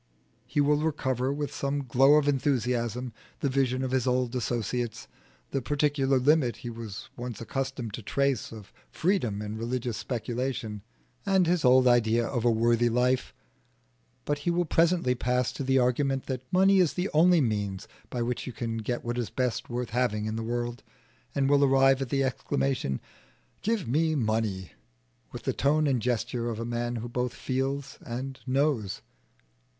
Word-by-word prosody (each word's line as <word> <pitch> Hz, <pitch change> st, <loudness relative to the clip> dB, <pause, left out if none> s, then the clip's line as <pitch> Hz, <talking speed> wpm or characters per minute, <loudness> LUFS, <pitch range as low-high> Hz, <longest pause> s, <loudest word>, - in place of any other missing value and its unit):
He 145 Hz, -, -1 dB
will 145 Hz, +1 st, +3 dB
recover 130 Hz, -4 st, 0 dB
with 145 Hz, 0 st, -3 dB
some 140 Hz, +1 st, -2 dB
glow 135 Hz, +4 st, +5 dB
of 150 Hz, -1 st, +3 dB
enthusiasm 125 Hz, -3 st, 0 dB, 0.3 s
the 140 Hz, -, +1 dB
vision 130 Hz, -1 st, +1 dB
of 130 Hz, -, -2 dB
his 130 Hz, -1 st, +1 dB
old 125 Hz, 0 st, +1 dB
associates, 120 Hz, -1 st, -2 dB, 0.4 s
the 135 Hz, -, -1 dB
particular 140 Hz, 0 st, +1 dB
limit 130 Hz, -1 st, +3 dB
he 120 Hz, -, -3 dB
was 115 Hz, -4 st, -8 dB
once 120 Hz, -3 st, -6 dB
accustomed 130 Hz, -2 st, -4 dB
to 115 Hz, -, -5 dB
trace 140 Hz, +2 st, 0 dB
of 110 Hz, -3 st, -11 dB, 0.2 s
freedom 120 Hz, -, 0 dB
in 105 Hz, +1 st, -5 dB
religious 120 Hz, 0 st, -2 dB
speculation, 120 Hz, -3 st, -3 dB, 0.4 s
and 190 Hz, -2 st, +3 dB
his 170 Hz, -1 st, +1 dB
old 130 Hz, 0 st, +6 dB
ideal 115 Hz, -1 st, +3 dB
of 120 Hz, -3 st, 0 dB
a 120 Hz, -, +4 dB
worthy 115 Hz, +1 st, +3 dB
life; 125 Hz, +2 st, +1 dB, 0.9 s
but 145 Hz, 0 st, -1 dB
he 145 Hz, -, -1 dB
will 175 Hz, +1 st, +1 dB
presently 165 Hz, -4 st, +2 dB
pass 125 Hz, 0 st, 0 dB
to -, -, -5 dB
the 135 Hz, 0 st, +2 dB
argument 130 Hz, +2 st, +1 dB
that 130 Hz, -1 st, -5 dB
money 195 Hz, +1 st, +5 dB
is 175 Hz, -5 st, +3 dB
the 185 Hz, +2 st, -2 dB
only 170 Hz, +3 st, +5 dB
means 105 Hz, -6 st, -1 dB, 0.2 s
by 120 Hz, -2 st, -2 dB
which 120 Hz, +1 st, -3 dB
you 125 Hz, -, -5 dB
can 115 Hz, 0 st, -3 dB
get 120 Hz, +2 st, -3 dB
what 120 Hz, +1 st, -2 dB
is 120 Hz, -, -2 dB
best 125 Hz, -2 st, -2 dB
worth 120 Hz, -1 st, -3 dB
having 110 Hz, -3 st, 0 dB
in 110 Hz, 0 st, -2 dB
the 115 Hz, -, -3 dB
world, 120 Hz, +1 st, -3 dB, 0.5 s
and 140 Hz, -1 st, +2 dB
will 140 Hz, 0 st, +4 dB
arrive 135 Hz, 0 st, +4 dB
at 135 Hz, -, -3 dB
the 135 Hz, +1 st, +1 dB
exclamation 130 Hz, -, -1 dB, 0.6 s
"Give 220 Hz, -, -1 dB
me 155 Hz, +5 st, +2 dB
money!" 110 Hz, -, -1 dB, 0.6 s
with -, -, -8 dB
the -, -, 0 dB
tone 150 Hz, +3 st, +2 dB
and 130 Hz, -5 st, +1 dB
gesture 120 Hz, 0 st, -1 dB
of 115 Hz, -1 st, -4 dB
a 115 Hz, -, -3 dB
man 120 Hz, 0 st, -2 dB
who 115 Hz, +1 st, -4 dB
both 125 Hz, 0 st, -2 dB
feels 135 Hz, +1 st, -3 dB
and 130 Hz, +3 st, -5 dB
knows. 125 Hz, -7 st, 0 dB
125 Hz, 170 wpm, -28 LUFS, 120-140 Hz, 0.9 s, old